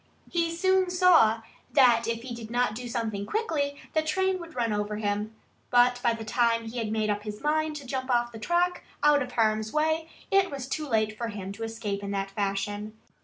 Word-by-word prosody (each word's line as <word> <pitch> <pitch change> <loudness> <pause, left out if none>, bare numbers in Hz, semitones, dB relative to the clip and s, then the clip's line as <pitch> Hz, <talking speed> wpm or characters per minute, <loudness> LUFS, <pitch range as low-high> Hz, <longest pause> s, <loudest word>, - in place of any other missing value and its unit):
He 335 -1 +1
soon 375 +2 +2
saw 335 - +5 0.3
that 240 -5 +5
if 230 0 -2
he 250 -1 -6
did 230 -2 -8
not 245 -2 +1
do 245 +3 -6
something 225 -4 -2
quickly 300 -10 -1
the 315 - +3
train 375 +4 0
would 335 -2 -10
run 230 -3 0
over 210 0 -2
him. 210 +1 -2 0.3
But 245 0 +4
by 235 - +3
the 225 -1 -6
time 230 0 +1
he 230 +2 -5
had 215 -2 -2
made 215 -1 +1
up 205 0 -2
his 210 0 -6
mind 310 +1 0
to 285 -2 -7
jump 260 0 -3
off 240 -1 +2
the 225 - -9
track, 350 +7 +1 0.2
out 295 -1 +5
of 250 -1 -4
harm's 220 -1 +1
way, 315 +1 +1 0.2
it 390 -1 +4
was 275 -3 -5
too 305 +2 -3
late 215 -3 +1
for 235 +1 -3
him 200 -3 -6
to 200 +3 -10
escape 225 -3 -3
in 200 - -5
that 195 -1 -2
fashion. 205 +2 -3
235 Hz, 215 wpm, -27 LUFS, 215-305 Hz, 0.3 s, saw